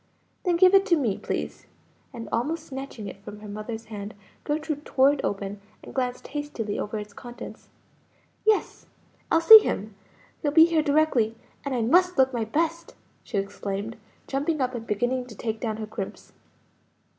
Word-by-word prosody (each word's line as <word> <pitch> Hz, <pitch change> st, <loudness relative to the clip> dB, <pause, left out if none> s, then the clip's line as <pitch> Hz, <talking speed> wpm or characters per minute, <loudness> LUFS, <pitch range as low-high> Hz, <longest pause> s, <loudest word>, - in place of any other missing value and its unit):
"Then 355 Hz, -2 st, +2 dB
give 365 Hz, +2 st, +6 dB
it 390 Hz, 0 st, +7 dB
to 345 Hz, -, +5 dB
me, 230 Hz, -9 st, 0 dB
please;" -, -, -4 dB, 0.4 s
and 235 Hz, -3 st, -7 dB
almost 310 Hz, +8 st, -1 dB
snatching 265 Hz, -6 st, -7 dB
it 195 Hz, 0 st, -9 dB
from 210 Hz, 0 st, -9 dB
her 215 Hz, -, -9 dB
mother's 215 Hz, +2 st, -6 dB
hand, 210 Hz, -1 st, -7 dB, 0.3 s
Gertrude 305 Hz, 0 st, -2 dB
tore 270 Hz, -1 st, +4 dB
it 290 Hz, -, -4 dB
open, 200 Hz, 0 st, -3 dB, 0.2 s
and -, -, -10 dB
glanced 250 Hz, -1 st, -2 dB
hastily 290 Hz, -8 st, -4 dB
over 210 Hz, +1 st, -3 dB
its 210 Hz, -1 st, -7 dB
contents. 240 Hz, +2 st, -10 dB, 0.7 s
"Yes, 435 Hz, -1 st, +1 dB, 0.4 s
I'll 325 Hz, -, +4 dB
see 440 Hz, +7 st, +12 dB
him! 215 Hz, -, -3 dB, 0.5 s
he'll 295 Hz, -, +1 dB
be 320 Hz, +2 st, +7 dB
here 330 Hz, -2 st, +2 dB
directly; 285 Hz, -7 st, +2 dB, 0.3 s
and 280 Hz, -2 st, -2 dB
I 235 Hz, -, +1 dB
must 360 Hz, +9 st, +4 dB
look 265 Hz, 0 st, +4 dB
my 230 Hz, -2 st, -1 dB
best!" 330 Hz, +7 st, -2 dB, 0.3 s
she 230 Hz, -, -4 dB
exclaimed, 200 Hz, +2 st, -3 dB, 0.3 s
jumping 290 Hz, +3 st, -1 dB
up 255 Hz, -1 st, 0 dB
and 235 Hz, -1 st, -6 dB
beginning 245 Hz, +4 st, 0 dB
to 225 Hz, -, -11 dB
take 220 Hz, +1 st, -3 dB
down 220 Hz, -3 st, -2 dB
her 220 Hz, -, -4 dB
crimps. 210 Hz, -2 st, -7 dB
245 Hz, 170 wpm, -26 LUFS, 215-305 Hz, 0.7 s, see